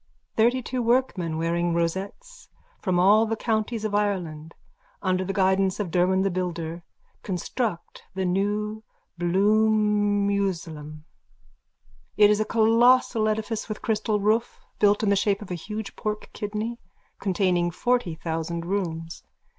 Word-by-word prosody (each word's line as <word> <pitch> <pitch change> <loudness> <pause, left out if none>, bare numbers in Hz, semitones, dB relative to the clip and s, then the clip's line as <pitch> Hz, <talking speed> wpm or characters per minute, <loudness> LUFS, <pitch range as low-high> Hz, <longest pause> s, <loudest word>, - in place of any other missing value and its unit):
_(Thirtytwo 245 +2 +1
workmen, 225 -10 +1
wearing 170 +1 0
rosettes, 195 - -4 0.3
from 185 -3 0
all 210 +5 +5
the 225 - -1
counties 220 0 -1
of 215 - -2
Ireland, 175 -7 -2 0.5
under 185 -1 +1
the 190 - -3
guidance 190 0 +2
of 195 -5 -3
Derwan 185 +2 +2
the 195 - +1
builder, 170 -2 -3 0.4
construct 190 +1 -3
the 190 -1 -1
new 205 +4 -1 0.4
Bloomusalem. 200 -5 +1 1.1
It 210 0 +7
is 210 - +2
a 215 - +1
colossal 230 0 +4
edifice 220 +1 -3
with 215 - -5
crystal 215 -1 0
roof, 215 +3 0 0.2
built 205 +1 +3
in 210 - +2
the 200 - +4
shape 200 +1 +1
of 185 - -11
a - - -1
huge 210 +5 -6
pork 215 0 -4
kidney, 215 +3 -4 0.4
containing 180 -2 +1
forty 240 -2 0
thousand 165 +1 -4
rooms. 170 -4 -3
200 Hz, 130 wpm, -25 LUFS, 175-215 Hz, 1.1 s, It